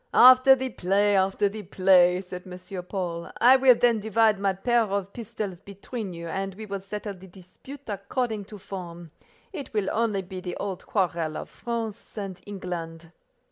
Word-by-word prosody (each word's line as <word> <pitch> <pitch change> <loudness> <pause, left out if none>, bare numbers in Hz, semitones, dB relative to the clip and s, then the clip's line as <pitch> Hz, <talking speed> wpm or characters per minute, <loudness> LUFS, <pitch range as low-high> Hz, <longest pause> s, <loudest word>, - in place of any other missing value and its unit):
"After 255 +1 +8
the 260 0 -3
play, 200 +2 +2
after 195 +2 +2
the 210 +2 -6
play," 185 -1 +4
said 180 -1 -9
M. 180 0 -7
Paul. 175 -3 -4
"I 250 +2 +7
will 260 -2 +6
then 235 -1 +3
divide 220 0 +2
my 200 -1 +2
pair 235 +6 +1
of 200 -2 -2
pistols 215 -6 -5
between 200 +2 -7
you, 170 -1 -7
and 195 +3 -3
we 215 +2 -8
will 200 -1 -4
settle 205 +1 -6
the 190 0 -14
dispute 195 +10 -13
according 210 +1 -3
to 210 +1 -10
form: 175 -4 -8 0.4
it 285 -7 -6
will 205 -2 +1
only 215 -4 0
be 185 0 -8
the 180 -1 -5
old 190 -3 -5
quarrel 170 -5 -1
of - - -8
France 230 -2 -5
and 195 -3 -5
England." 170 -4 -6
195 Hz, 175 wpm, -26 LUFS, 180-220 Hz, 0.4 s, After